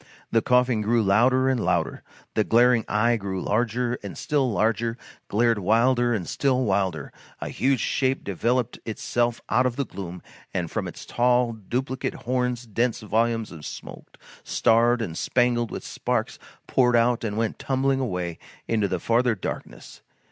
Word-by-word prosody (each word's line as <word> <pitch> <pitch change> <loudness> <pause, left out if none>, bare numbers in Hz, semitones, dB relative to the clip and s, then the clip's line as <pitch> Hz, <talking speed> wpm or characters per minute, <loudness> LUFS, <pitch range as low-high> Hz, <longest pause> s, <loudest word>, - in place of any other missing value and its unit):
The 115 - +3
coughing 125 -2 +2
grew 115 +2 +2
louder 125 +6 +3
and 130 -4 +1
louder, 85 -2 0 0.3
the 110 - +2
glaring 120 +1 +4
eye 115 +3 +2
grew 95 -3 -4
larger 120 +4 0
and 100 - -7
still 140 -4 0
larger, 115 +2 0 0.3
glared 115 +1 +2
wilder 120 +5 +3
and 105 -7 -1
still 130 -2 +1
wilder. 95 -7 -1 0.3
A - - -5
huge 135 -3 +1
shape 130 0 0
developed 120 +5 -1
itself 120 +1 -1
out 125 +3 +3
of 120 - -3
the 140 - -1
gloom, 90 -4 -8 0.3
and 85 -3 -2
from - - -2
its - - -9
tall 120 0 +2
duplicate 125 +5 -3
horns 125 -1 -2
dense 115 +2 -1
volumes 115 +1 0
of 80 -3 -10
smoke, - - -9 0.3
starred 115 +1 +3
and 80 -6 -5
spangled 120 +3 +1
with - - -6
sparks, - - -2 0.3
poured 125 -2 +3
out 120 0 +3
and 105 -2 -3
went 115 -1 -1
tumbling 135 0 +1
away 90 -9 -3 0.3
into 110 -3 +1
the 95 -2 -2
farther 115 +4 +2
darkness. - - -7
115 Hz, 155 wpm, -25 LUFS, 105-125 Hz, 0.3 s, glaring